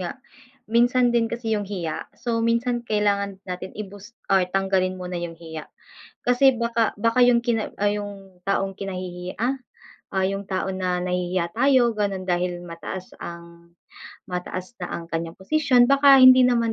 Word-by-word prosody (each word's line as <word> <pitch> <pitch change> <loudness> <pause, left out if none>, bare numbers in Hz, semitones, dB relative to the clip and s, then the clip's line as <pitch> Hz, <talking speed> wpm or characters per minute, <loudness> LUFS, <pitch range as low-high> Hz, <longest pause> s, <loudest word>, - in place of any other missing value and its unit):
nga, 185 +9 -5 0.5
minsan 245 +1 +3
din 230 -1 +3
kasi 235 -1 -4
yung 205 -1 -2
hiya 175 -6 -4
so 235 -2 -2
minsan 235 +1 +1
kailangan 200 -2 0
natin 185 0 -6
i-boost 205 +2 -9 0.2
or 195 - +6
tanggalin 190 -1 +1
muna 180 -1 -5
yung 170 -1 -5
hiya, 160 -2 -8 0.6
kasi 250 +2 +5
baka 235 -1 0
baka 230 +3 +2
yung 240 -1 +4
kina 225 -3 0
ay 205 +1 +1
yung, 195 -3 -10
taong 195 0 0
kinahihiya, 185 -2 -5
ah 255 +4 +1 0.6
o 190 - +1
yung 195 +1 -3
tao 190 0 -1
na 185 -1 -1
nahihiya 180 -1 -1
tayo 255 -1 +4
gano'n 200 -3 -2
dahil 175 -1 -1
mataas 175 +2 -7
ang 170 0 -10 0.6
mataas 180 +2 -5
na 180 - -3
ang 170 - -4
kanyang 165 0 -4
posisyon 250 +3 +3
baka 275 0 +7
hindi 255 0 +9
naman 235 -2 +2
195 Hz, 160 wpm, -24 LUFS, 180-235 Hz, 0.6 s, hindi